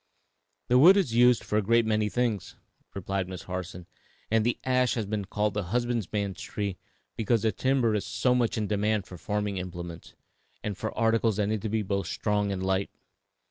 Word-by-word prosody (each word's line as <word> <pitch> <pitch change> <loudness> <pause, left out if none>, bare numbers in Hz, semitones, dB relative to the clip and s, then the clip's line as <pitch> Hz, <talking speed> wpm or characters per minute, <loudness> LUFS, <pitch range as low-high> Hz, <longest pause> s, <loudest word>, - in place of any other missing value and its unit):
"The 125 +1 +5
wood 180 +8 +8
is 175 - +1
used 120 -1 +5
for 105 - 0
a - - +1
great 115 +3 +3
many 110 -1 +1
things," 115 -4 -1 0.4
replied 95 -1 -2
Miss 90 -2 -7
Harson, 90 -1 -6 0.5
"and 110 -1 +3
the 120 +2 +1
ash 125 -1 +2
has 115 -3 -1
been 105 0 -3
called 105 +1 -1
the 105 -2 -2
husbandman's 105 -3 -2
tree 100 -3 -4 0.4
because 115 0 +1
the 110 - +3
timber 130 -3 +1
is 105 - 0
so 125 - +1
much 120 -3 +1
in 110 - 0
demand 105 0 0
for 90 - -11
farming 105 0 -2
implements, 85 -2 -7 0.5
and 105 -2 -3
for - - -4
articles 115 -1 +2
that 105 -1 +1
need 110 -2 -1
to 110 - -3
be 110 0 0
both 100 0 -2
strong 105 -1 0
and 95 -1 -3
light. 95 +1 0
105 Hz, 190 wpm, -28 LUFS, 100-115 Hz, 0.5 s, wood